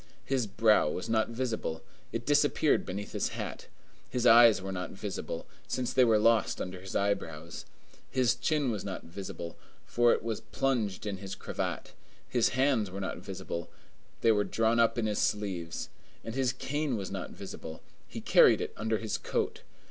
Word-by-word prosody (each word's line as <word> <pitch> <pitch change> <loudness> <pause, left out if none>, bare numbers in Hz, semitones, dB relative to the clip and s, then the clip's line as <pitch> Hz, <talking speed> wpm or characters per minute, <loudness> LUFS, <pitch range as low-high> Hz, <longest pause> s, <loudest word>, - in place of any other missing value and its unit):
His 130 -5 0
brow 105 -5 +4
was 90 +8 -4
not 110 0 +2
visible; 115 -9 -3 0.3
it - - -4
disappeared - - +3
beneath 100 +3 -5
his - - 0
hat: - - -5 0.4
his 125 -1 -1
eyes 115 -3 +8
were 95 0 -5
not 90 -1 -4
visible, 100 0 -5 0.2
since 125 -1 -2
they 130 - +5
were 115 -3 +5
lost 115 +1 +3
under 90 0 -5
his 95 0 -8
eyebrows: 85 -5 -2 0.4
his 125 -2 +3
chin 140 +1 0
was 105 -4 -3
not 95 -2 -5
visible, 85 -1 -7 0.3
for 120 0 +3
it - - +1
was 115 -2 -3
plunged 115 -7 -1
in 100 -2 -3
his 100 0 -6
cravat: - - -4 0.3
his 120 -2 +2
hands 130 -7 +3
were 95 +2 -6
not 95 - -4
visible; 85 0 -6 0.5
they 115 - +5
were 105 -1 +3
drawn 115 +2 +1
up 115 0 +3
in 115 - +1
his 105 -1 0
sleeves: 95 -6 -2 0.3
and 115 - -5
his 130 -1 +1
cane 145 -3 -2
was 95 -2 -5
not 95 -2 -4
visible; 80 -4 -8 0.2
he - - -7
carried - - +6
it - - -4
under 110 0 0
his 110 -1 -3
coat. - - -2
110 Hz, 175 wpm, -30 LUFS, 95-120 Hz, 0.5 s, eyes